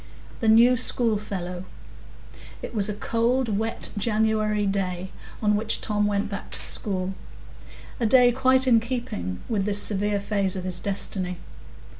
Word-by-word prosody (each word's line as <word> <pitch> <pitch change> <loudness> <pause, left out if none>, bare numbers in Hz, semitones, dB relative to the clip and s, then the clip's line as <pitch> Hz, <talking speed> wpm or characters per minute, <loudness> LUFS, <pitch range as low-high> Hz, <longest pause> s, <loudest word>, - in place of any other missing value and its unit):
The 225 - -1
New 235 +3 +6
Schoolfellow 205 -7 -1 1.0
It - - -6
was 210 -2 0
a 210 - -3
cold, 230 0 0
wet 225 +1 -2
January 215 0 0
day 190 -2 -2 0.3
on 210 0 +3
which 220 +2 0
Tom 210 -1 0
went 200 -1 -1
back 200 -1 -7
to - - -1
school; 190 -2 -1 0.9
a 230 - +1
day 245 +1 +5
quite 260 +1 +3
in 240 -3 +5
keeping 220 - -5
with 205 -4 -1
this 205 0 +5
severe 205 0 +1
phase 200 -2 0
of 185 - -4
his 180 -1 +1
destiny. 190 -2 -1
210 Hz, 145 wpm, -24 LUFS, 195-230 Hz, 1.0 s, New